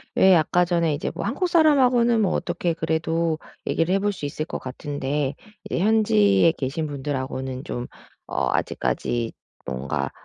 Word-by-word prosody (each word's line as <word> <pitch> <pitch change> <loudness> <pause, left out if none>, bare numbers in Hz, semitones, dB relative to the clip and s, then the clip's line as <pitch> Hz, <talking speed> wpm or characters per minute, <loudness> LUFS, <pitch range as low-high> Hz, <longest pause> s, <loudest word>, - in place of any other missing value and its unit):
왜 190 -1 +6
아까 175 +2 +3
전에 170 -3 +1
이제 145 - -3
뭐 - - -5
한국사람하고는 260 - +3
뭐 195 - +2
어떻게 175 -1 -1
그래도 160 0 0 0.3
얘기를 165 +3 +1
해볼 205 +1 +1
수 180 -7 -6
있을 155 +2 -3
것 - - -5
같은데 140 +1 -3 0.3
이제 - - -1
현지에 165 - +4
계신 145 +3 -3
분들하고는 130 -2 -4
좀 120 0 -5 0.4
어 - - 0
아직까지 120 -1 -1 0.3
뭔가 70 +2 -3
160 Hz, 315 characters per minute, -24 LUFS, 130-185 Hz, 0.4 s, 왜